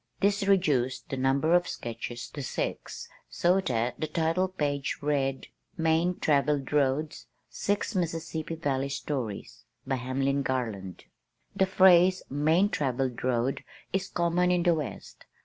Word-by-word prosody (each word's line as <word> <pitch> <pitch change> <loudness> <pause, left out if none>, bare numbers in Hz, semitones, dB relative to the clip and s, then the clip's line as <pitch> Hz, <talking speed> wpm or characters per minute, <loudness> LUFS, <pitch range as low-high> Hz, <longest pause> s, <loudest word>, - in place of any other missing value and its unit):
This 200 0 +1
reduced 145 -10 +1
the - - -2
number 135 +5 +2
of 175 0 +4
sketches 120 +1 -6
to 145 - -6
six 130 - -4 0.2
so 180 +3 +2
that 120 -8 -1
the 155 - -1
title 165 +4 +1
page 145 -6 -2
read: 135 -2 -1 0.3
MAIN 165 +2 +2
TRAVELLED 145 -1 +1
ROADS 145 +2 0 0.2
Six 205 +3 -1
Mississippi 165 -3 -3
Valley 140 -4 -1
Stories 130 -6 -4 0.2
BY 135 0 0
HAMLIN 135 +2 0
GARLAND 115 -8 -3 0.5
The 190 - +3
phrase 185 -1 +5
"main 160 +8 +3
travelled 130 - -1
road" 125 +1 0 0.3
is 195 0 0
common 175 0 +1
in 180 -1 +2
the 175 -1 +4
west. 150 -4 -6
150 Hz, 130 wpm, -28 LUFS, 130-175 Hz, 0.5 s, phrase